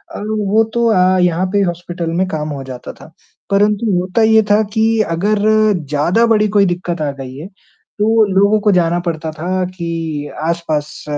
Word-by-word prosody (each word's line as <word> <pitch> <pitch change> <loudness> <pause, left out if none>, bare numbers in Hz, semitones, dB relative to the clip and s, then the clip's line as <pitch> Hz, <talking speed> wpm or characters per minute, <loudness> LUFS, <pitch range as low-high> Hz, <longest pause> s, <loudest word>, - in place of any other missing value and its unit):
अ, - - -5
वो 215 0 +1
तो 235 0 +1
अ 185 -1 +3
यहाँ 180 +1 +1
पे 205 - +3
हॉस्पिटल 175 -1 -4
में 190 - +1
काम 155 -4 -4
हो 140 -2 -5
जाता 130 -2 -8
था। 160 - -16 0.4
परंतु 205 +2 +2
होता 185 +5 -1
ये 220 0 +5
था 210 +1 +5
कि 220 -1 +1 0.3
अगर 205 +5 0 0.5
ज़्यादा 170 +10 +2
बड़ी 215 -2 +3
कोई 200 -1 +5
दिक़्क़त 175 -2 -3
आ 145 -2 -1
गई 130 -1 -8
है, 155 +5 -8 0.5
तो 220 +1 +3
लोगों 200 +2 +4
को 210 0 +2
जाना 175 -2 +2
पड़ता 165 -2 -4
था 180 +4 -2
कि 165 -4 -4 0.2
आस-पास 160 -3 -3
180 Hz, 175 wpm, -16 LUFS, 165-210 Hz, 0.5 s, ये